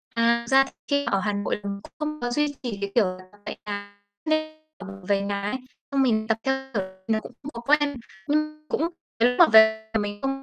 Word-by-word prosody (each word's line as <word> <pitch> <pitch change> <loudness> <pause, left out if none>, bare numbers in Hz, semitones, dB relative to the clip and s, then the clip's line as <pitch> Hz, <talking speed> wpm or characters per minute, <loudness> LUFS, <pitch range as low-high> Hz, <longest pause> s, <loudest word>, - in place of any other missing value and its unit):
À, 235 0 +3
thực - - -7
ra 270 0 +7 0.2
khi 285 0 +2
ở 195 - +1
Hà 210 0 0
Nội 205 +1 -2
mình 200 0 -4
cũng - - -14
không 305 0 -3
có 245 0 -1
duy 295 +2 +1
trì, 225 -5 -4
cái 200 0 -3
kiểu 230 -4 +5
là, 185 0 -4
tập 205 - -21
tại - - -5
nhà, 205 0 -6 0.2
nên 310 0 0 0.2
là 200 - -9
mình 195 -1 -10
về 200 -1 +3
nhà 200 0 -2
ấy, 205 +6 -1 0.3
xong 275 -1 +2
mình 220 -4 +2
tập, 220 0 +2
theo 265 0 +2 0.2
kiểu, 195 - +1 0.3
nó 220 -1 +2
cũng - - -11
không 290 - -6
có 235 - -6
quen, 290 +2 +2 0.3
nhưng 305 +1 0
cũng 330 +2 0 0.3
nếu 245 +1 +4
mà 345 - +9
về 220 0 +6
mình 205 0 -4
không 270 0 -2
230 Hz, 240 wpm, -25 LUFS, 205-285 Hz, 0.3 s, mà